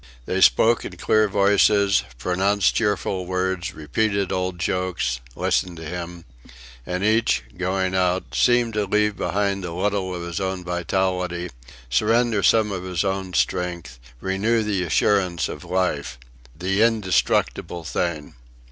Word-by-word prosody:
They 95 +1 -1
spoke 115 +4 +5
in - - -8
clear 110 0 +3
voices, 100 0 +3 0.2
pronounced 95 +7 +1
cheerful 100 -4 -1
words, 95 0 -2
repeated 100 +6 -1
old 90 -1 -2
jokes, 90 -9 -1 0.2
listened 90 -2 0
to 80 - -8
him; 85 +1 -6 0.6
and 90 +1 -2
each, 110 - +2
going 95 0 -1
out, 90 0 0
seemed 120 -2 +3
to 105 -1 0
leave 105 +1 +1
behind 100 -1 -1
a 85 - -4
little 95 +1 -1
of 85 - -5
his 85 -1 -4
own 95 -1 -3
vitality, 90 0 -2 0.4
surrender 110 - +2
some 105 +2 +3
of 95 -2 -3
his 90 -2 -2
own 95 -2 -2
strength, 85 -9 -1 0.2
renew 105 - 0
the 105 -3 -1
assurance 90 0 +1
of 75 - -8
life 75 -8 -1 0.4
the 95 +4 0
indestructible 105 -5 +1
thing! 80 -1 -3
95 Hz, 135 wpm, -23 LUFS, 90-100 Hz, 0.6 s, spoke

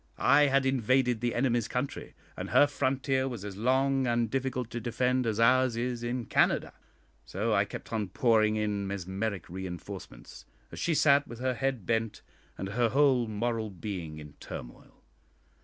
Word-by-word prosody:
I 145 +1 +5
had 135 0 +2
invaded 130 -2 +2
the 120 -1 -1
enemy's 120 -2 +1
country, 125 +3 -4 0.2
and - - -5
her - - +6
frontier 135 -1 0
was 120 -6 -6
as 100 -2 -6
long 130 +4 +1
and 120 -2 +1
difficult 130 -3 -2
to 120 - -3
defend 125 +2 0
as 110 -1 -1
ours 125 0 +4
is 120 0 -2
in 120 0 -3
Canada. - - +1 0.5
So 110 +4 -2
I 100 -1 +3
kept 100 - -9
on 105 -3 -1
pouring 110 +2 +2
in 105 -2 -1
mesmeric 95 0 -3
reinforcements, 90 -8 -8 0.3
as - - -8
she 170 - 0
sat 140 -1 +4
with 120 - -9
her 130 +1 -1
head 130 -4 -2
bent, 115 -1 -1 0.3
and 95 - -4
her 115 +3 +1
whole 130 -2 +3
moral 110 +1 -2
being 90 -4 -6
in 75 -2 -10
turmoil. - - -10
120 Hz, 165 wpm, -29 LUFS, 105-130 Hz, 0.5 s, her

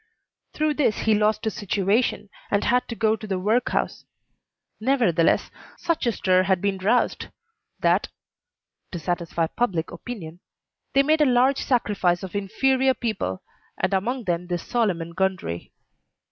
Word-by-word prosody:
Through 305 0 +1
this 275 -7 +1
he 220 - +3
lost 210 0 +2
his 220 - -1
situation, 205 +2 0 0.2
and 200 0 +1
had 250 +1 +2
to 230 - -5
go 220 -1 +2
to 215 0 -9
the 190 -2 -1
workhouse; 215 +7 0 0.8
nevertheless, 215 - +2 0.3
such 335 -7 -1
a - - +4
stir 185 -3 +2
had 190 -1 +2
been 195 0 -1
roused 220 +6 +1 0.5
that - - +3 0.8
(to 175 - -4
satisfy 170 0 -1
public 170 -3 -1
opinion) 180 -9 -8 0.6
they 275 - +6
made 310 +2 +3
a - - +6
large 255 +2 +3
sacrifice 200 -8 +1
of 190 - -7
inferior 260 +6 +2
people, 190 - -3 0.3
and - - 0
among 240 +7 -1
them 175 -2 -2
this 175 -1 -3
Solomon 185 -9 0
Gundry. 185 - -2
210 Hz, 145 wpm, -24 LUFS, 180-245 Hz, 0.8 s, they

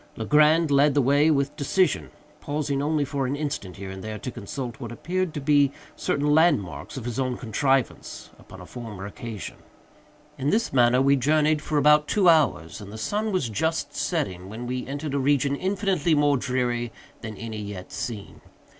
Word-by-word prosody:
Legrand 150 +6 +4
led 140 0 +4
the - - +4
way 145 +4 +4
with 140 -1 +1
decision; 170 +5 +1 0.3
pausing 145 -1 -2
only 150 0 +1
for 140 -1 -2
an 135 - -1
instant, 140 - -4
here 95 -1 -7
and 95 0 -8
there, 110 0 -5
to 125 +5 -6
consult 120 +4 -6
what 120 -4 -6
appeared 180 +8 -2
to 150 - -5
be 145 -1 +3 0.2
certain 145 - -1
landmarks 145 - +1
of 125 - -6
his 120 0 -3
own 130 -2 -1
contrivance 135 +2 -1
upon - - -13
a - - -10
former 110 -6 -8
occasion. 105 0 -7 0.8
In 135 +2 0
this 220 -2 +1
manner 125 0 +4
we 140 +1 +4
journeyed 150 +3 +2
for 155 - -2
about 150 +1 +5
two 200 -3 +2
hours, 150 - +3
and 100 0 -9
the 110 - -8
sun 210 - -1
was 185 -10 0
just 145 +4 -2
setting 95 - -2
when 115 +4 -7
we 125 +1 -4
entered 145 +1 -4
a 140 - +1
region 140 0 +2
infinitely 185 -3 0
more 145 -1 +3
dreary 125 -3 -1 0.3
than 110 -2 -7
any 110 -2 -6
yet 100 -3 -7
seen. 110 -5 -6
140 Hz, 180 wpm, -25 LUFS, 120-150 Hz, 0.8 s, about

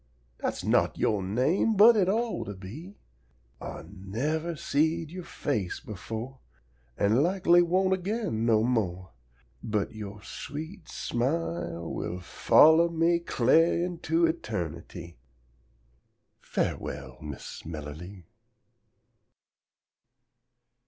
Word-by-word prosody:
Dat's - - -3
not - - +2
yo' 105 -2 +1
name, 130 - +1
but 225 +4 +8
it 190 -3 +3
ought 230 +3 0
to 100 - -6
be! 135 - -9 0.7
Ah - - -7
nevah 125 - -3
seed 160 +2 0
yo' 180 +1 -6
face 110 - -3
befo' 115 +5 -7 0.6
An' 110 +6 +3
lakly 175 0 +4
won't 185 +2 +2
again 190 - -2
no 110 -2 +3
mo'; 95 -7 -1 0.5
But 105 -2 -2
yo' 105 -1 -7
sweet 155 +7 -7
smile 85 - -2
will 90 - -4
follow 160 - +5
me 170 +1 +2
Cla'r 165 +3 +3
into 170 -1 +1
eternity! 85 - -4 1.2
Farewell, 65 -3 -3
Miss 75 -3 -8
Melerlee! 80 +4 -8
125 Hz, 100 wpm, -28 LUFS, -, 1.2 s, but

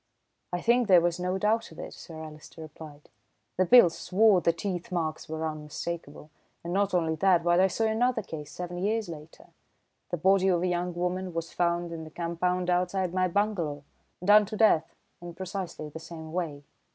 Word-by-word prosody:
"I 175 0 -2
think 240 +2 +3
there 185 -3 +7
was 170 +1 0
no 180 +1 -1
doubt 215 +2 0
of 160 - -14
it," - - -7
Sir 160 - -11
Alister 155 +1 -12
replied. 155 -1 -11 0.5
"The 185 0 +2
Bhils 240 -7 +8
swore 200 0 +3
the 170 - +3
teeth 175 +1 -5
marks 160 -3 -3
were 160 0 -3
unmistakable, 155 0 -6 0.3
and 170 +1 -4
not 200 0 +1
only 165 -2 +1
that, 180 0 +3
but 175 0 +3
I 190 - +5
saw 210 +4 -2
another 225 +1 +1
case 150 -4 -8
seven 175 0 -6
years 215 +3 0
later. 155 -1 -11 0.6
The 175 - -2
body 190 +3 +3
of 175 -2 +2
a - - +1
young 175 0 -1
woman 180 0 -2
was 165 0 -4
found 170 0 0
in 165 -1 -6
the 155 - -9
compound 175 +2 -2
outside 180 0 0
my 185 0 +2
bungalow, 175 -7 -1 0.4
done 210 +1 +6
to 215 - -5
death 210 -8 +4 0.3
in 175 -1 -8
precisely 185 -4 -5
the 160 - -8
same 160 -1 -9
way. 155 -5 -3
175 Hz, 190 wpm, -28 LUFS, 165-190 Hz, 0.6 s, Bhils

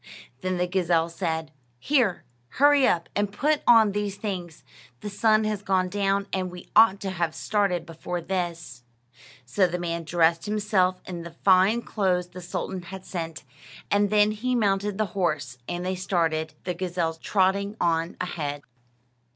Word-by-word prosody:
Then 185 0 -1
the 180 - +1
gazelle 175 -3 +1
said: 160 -3 -3 0.3
"Here, 225 - +1 0.3
hurry 285 -1 +5
up 170 -1 +1
and 205 -1 0
put 295 +8 +1
on 225 -3 +7
these 205 -1 -2
things. 180 -6 -5 0.4
The 210 - -5
sun 215 +1 +3
has 215 -2 -2
gone 185 -2 +1
down, 200 0 0
and 185 -1 -1
we 180 0 -11
ought 215 -3 +6
to 195 - -3
have 170 -3 -2
started 195 -5 0
before 170 +2 -5
this." 170 -7 -4 0.6
So 185 +10 +2
the 175 0 -3
man 170 -1 -3
dressed 165 +2 +2
himself 205 -3 +1
in 175 -2 -6
the 170 0 -10
fine 195 +5 +5
clothes 180 -4 0
the 180 - -9
sultan 180 +1 -4
had 190 +2 -9
sent, 165 -3 -5 0.5
and 205 0 +3
then 210 0 +4
he 250 +4 -1
mounted 200 -2 +1
the 215 - +1
horse, 145 -9 -1
and 175 +1 -3
they 185 - 0
started; 165 -4 -1
the 180 - -2
gazelle 175 -2 -2
trotting 200 +4 0
on 165 0 0
ahead. 145 -5 -4
185 Hz, 160 wpm, -26 LUFS, 170-205 Hz, 0.6 s, on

